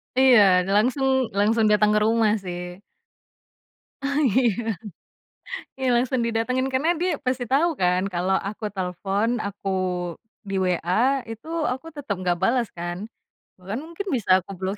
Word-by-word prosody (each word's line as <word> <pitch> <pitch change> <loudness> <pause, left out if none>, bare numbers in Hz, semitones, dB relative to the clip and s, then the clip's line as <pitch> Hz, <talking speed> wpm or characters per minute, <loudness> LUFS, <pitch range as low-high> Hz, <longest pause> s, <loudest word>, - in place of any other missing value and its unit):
Iya, 210 -9 +6
langsung 255 +5 +2 0.3
langsung 220 +2 +3
datang 210 0 +4
ke 210 - +3
rumah 225 -1 +3
sih. 180 0 -6 1.2
Ah, 280 +1 0
iya. 225 -2 +1 1.0
Iya 260 -1 0
langsung 245 +1 +1
didatengin, 255 +3 0
karena 305 +7 +2
dia 360 +1 +1 0.2
pasti 255 0 0
tau 315 +5 +3
kan 180 -3 +1
kalau 180 +2 +1
aku 215 +1 -7
telepon, 195 +3 -1
aku 200 0 -5 0.8
di 195 - -3
WA 185 +9 +1
itu, 225 +8 -9 0.2
aku 260 +5 -7
tetep 285 -8 -3
nggak 175 -1 0
bales 240 -2 +2
kan. 175 +1 -4 0.6
Bahkan 195 +6 -5
mungkin 340 +5 -7
bisa 230 -6 -4
aku 190 - -12
blokir, 190 +2 -3
220 Hz, 140 wpm, -24 LUFS, 190-260 Hz, 1.2 s, Iya